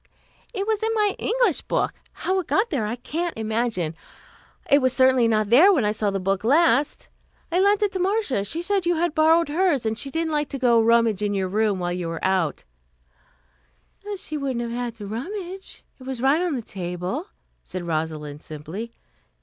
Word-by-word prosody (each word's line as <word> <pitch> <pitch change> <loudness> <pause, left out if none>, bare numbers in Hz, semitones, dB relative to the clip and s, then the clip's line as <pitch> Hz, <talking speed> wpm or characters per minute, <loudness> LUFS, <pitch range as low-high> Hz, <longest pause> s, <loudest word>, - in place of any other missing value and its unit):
"It 400 -4 -3
was 435 -1 0
in 445 - 0
my 415 -2 +2
English 465 - +1
book. - - -1 0.2
How 380 +1 -1
it 365 - -5
got 415 +4 +1
there 240 -9 0
I 225 - -2
can't 325 +7 -4
imagine. 220 -7 -1 0.7
It 280 - +5
was 255 -1 +2
certainly 260 -2 +4
not 215 -1 +1
there 325 +12 +8
when 280 - +2
I 210 - +2
saw 210 -1 -1
the 195 0 -2
book 195 +1 -1
last. 290 +1 +2 0.4
I 350 - +2
lent 405 +2 +3
it 410 - +1
to 375 - -3
Marcia. 380 - 0
She 320 - -3
said 390 -1 0
you 350 - +3
had 335 -1 0
borrowed 320 +2 +4
hers, 310 -5 +1
and 220 0 0
she 275 +5 -3
didn't 325 +2 -2
like 295 -1 0
to 275 - -4
go 245 -3 +4
and 225 - +2
rummage 230 -3 +3
in 205 -1 0
your 190 -1 -1
room 210 0 +1
while 175 -1 -2
you 175 -1 -3
were 165 0 -4
out 185 -6 0 0.9
" 65 - -12
"She 310 -4 -5
wouldn't 265 -4 -2
have 235 -1 -4
had 240 -1 -3
to 210 -3 -8
rummage. 365 - -6 0.2
It 255 - -12
was 265 -2 -4
right 275 +6 +3
on 350 -5 0
the 240 - -4
table," 180 - -4 0.4
said 185 -1 -6
Rosalind 155 -2 -3
simply. 165 +10 -7
245 Hz, 205 wpm, -24 LUFS, -, 0.9 s, there